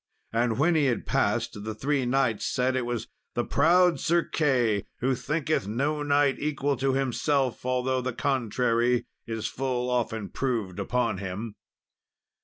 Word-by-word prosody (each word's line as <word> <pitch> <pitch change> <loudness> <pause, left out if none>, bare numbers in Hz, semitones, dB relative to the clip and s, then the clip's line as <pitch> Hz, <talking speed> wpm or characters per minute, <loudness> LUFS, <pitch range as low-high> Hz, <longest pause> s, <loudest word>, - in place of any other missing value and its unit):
And 115 -1 +1
when 160 +6 +3
he 155 -3 +3
had 120 -5 0
passed, 105 - 0
the 110 0 -4
three 135 +2 0
knights 130 -4 +1
said 130 +1 +1
it 125 -2 -1
was 120 -2 -3 0.3
the - - 0
proud 175 +4 +4
Sir 170 +1 +2
Key, 125 -9 +1
"who 130 +2 +1
thinketh 155 -3 -1
no 140 +8 -1
knight 145 -1 +2
equal 145 -1 0
to 135 +1 +1
himself, 135 -1 0
although 130 0 +1
the 130 +1 -2
contrary 120 -1 +1 0.2
is 110 -1 -4
full 125 -1 -2
often 115 -4 -1
proved 110 -8 -2
upon 115 -1 0
him." 100 +3 -5
125 Hz, 150 wpm, -27 LUFS, 115-140 Hz, 0.3 s, proud